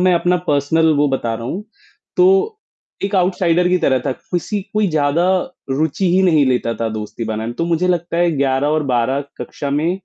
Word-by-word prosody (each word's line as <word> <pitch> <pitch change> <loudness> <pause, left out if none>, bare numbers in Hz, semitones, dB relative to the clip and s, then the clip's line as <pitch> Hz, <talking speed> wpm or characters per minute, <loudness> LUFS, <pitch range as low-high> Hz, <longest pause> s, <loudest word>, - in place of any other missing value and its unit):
मैं 185 0 +4
अपना 175 +1 +2
पर्सनल 155 +3 +2
वो 145 +1 +3
बता 120 -4 -1
रहा 115 +1 -6
हूँ, 190 +11 -4 0.5
तो 390 +4 +3 0.5
एक 200 +1 -2
आउटसाइडर 180 -1 +2
की 180 0 +2
तरह 130 -6 +2
था। - - +1
किसी 180 +8 -4
कोई 210 -1 +2
ज़्यादा 155 +3 +1 0.4
रुचि 155 +7 0
ही 190 - +4
नहीं 160 -6 +4
लेता 125 -2 0
था 115 - 0
दोस्ती 110 +1 -5
बनाने 110 0 -3
में, 120 - -5
तो 165 - -2
मुझे 170 +1 +1
लगता 170 -1 -1
है 175 0 +3
11 135 +1 +1
और 155 +1 +1
12 125 +3 +1 0.2
कक्षा 140 - -5
में 150 +4 +1
160 Hz, 195 wpm, -18 LUFS, 135-180 Hz, 0.5 s, मैं